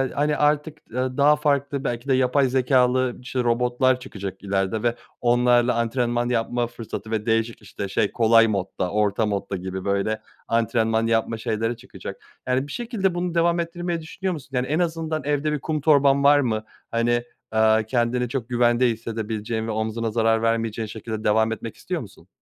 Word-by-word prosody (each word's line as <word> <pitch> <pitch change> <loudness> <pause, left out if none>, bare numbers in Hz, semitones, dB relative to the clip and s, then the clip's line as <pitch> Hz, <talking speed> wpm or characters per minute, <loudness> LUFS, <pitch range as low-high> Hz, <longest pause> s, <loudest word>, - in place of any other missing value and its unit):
hani 150 +1 +1
artık, 150 +1 +1
eee, 120 - -10 0.2
daha 145 +1 +6
farklı 140 -2 0
belki 120 +1 -3
de 135 - +3
yapay 130 +1 +3
zekâlı, 130 -1 +2
işte, 125 -1 -2
robotlar 125 +2 +2
çıkacak 100 -7 -7
ileride 100 +2 -1
ve 120 0 +1 0.3
onlarla 120 0 +3
antrenman 120 +1 0
yapma 120 0 0
fırsatı 115 -1 -7
ve 110 -1 -1
değişik 115 0 0
işte, 100 0 -6
şey, 100 +1 +1
kolay 115 -1 +5
modda, 95 -3 -2
orta 105 +1 +1
modda 100 -2 -2
gibi 95 +1 -5
böyle 100 +2 0 0.3
antrenman 115 -1 +1
yapma 115 0 +1
şeyleri 115 +2 -2
çıkacak. - - -9 0.3
Yani 130 +2 +1
bir - - -9
şekilde 225 -7 -1
bunu 175 -1 -2
devam 170 +1 +3
ettirmeyi 170 0 -3
düşünüyor 180 +4 -3
musun? 150 -3 -9
Yani 125 0 0
en 155 +4 0
azından 160 -3 -1
evde 150 +1 0
bir 150 - -1
kum 155 +1 -2
torban 140 -2 +4
var 145 +1 +6
mı? 110 -5 0 0.3
Hani, 120 +1 +1 0.3
eee, 110 0 +4
kendini 120 0 0
çok 125 -2 -4
güvende 120 +1 +3
hissedebileceğin 110 0 -3
ve 115 - -2
omzuna 110 +1 -2
zarar 115 0 +2
vermeyeceğin 115 -1 0
şekilde 110 0 -6
devam 110 +1 +3
etmek 115 0 -5
istiyor 180 -3 -4
musun? 105 - -13
120 Hz, 170 wpm, -23 LUFS, 110-140 Hz, 0.3 s, daha